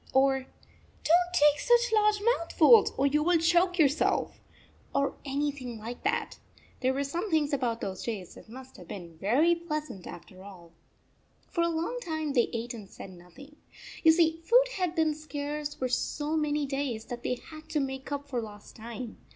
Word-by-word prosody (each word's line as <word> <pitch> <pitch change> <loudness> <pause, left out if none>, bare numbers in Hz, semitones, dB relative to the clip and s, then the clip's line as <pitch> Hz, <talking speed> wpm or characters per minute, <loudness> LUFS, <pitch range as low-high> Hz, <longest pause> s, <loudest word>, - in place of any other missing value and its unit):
or 270 0 +4 0.3
" - - -31
Don 320 - +5 0.2
t 360 - +1
take 295 - -9
such 480 -1 +3
large 425 -1 +3
mouthfuls 420 -1 +5
or 275 - +2
you 295 +2 +2
will 345 +2 +3
choke 350 +2 +3
yourself," 305 -2 +1 0.5
or 280 0 +1
anything 275 -4 -3
like 230 +3 -7
that. 415 +5 -1 0.4
There 260 0 +1
were 280 - 0
some 340 +9 -3
things 310 -3 +1
about 240 -4 -1
those 190 -2 -4
days 200 -7 -5
that - - -15
must 260 +2 -11
have 180 - -13
been 170 -4 -8
very 275 - +3
pleasant, 305 - -5
after 185 +2 -11
all. 180 -4 -13 0.8
35 - - -30
For 340 - +1
a 335 - +2
long 335 +9 -2
time 315 -6 -3
they 240 -4 +3
ate 235 +1 -4
and 210 -4 -10
said 190 - -10
noth 180 +3 -16
ing. 285 +2 -13 0.4
You 320 - +7
see, 325 0 +2
food - - +5
had 360 -3 -1
been 320 -2 +2
scarce 295 -1 -5
for 255 - -2
so 295 +4 -1
many 300 -1 0
days 270 -5 -3
that 240 -1 -7
they 250 - -1
had 310 +4 -13
to 305 - 0
make 265 0 -4
up 285 0 -4
for 250 -4 -2
lost 210 -2 -11
time. 235 +1 -8
285 Hz, 190 wpm, -29 LUFS, 240-325 Hz, 0.8 s, You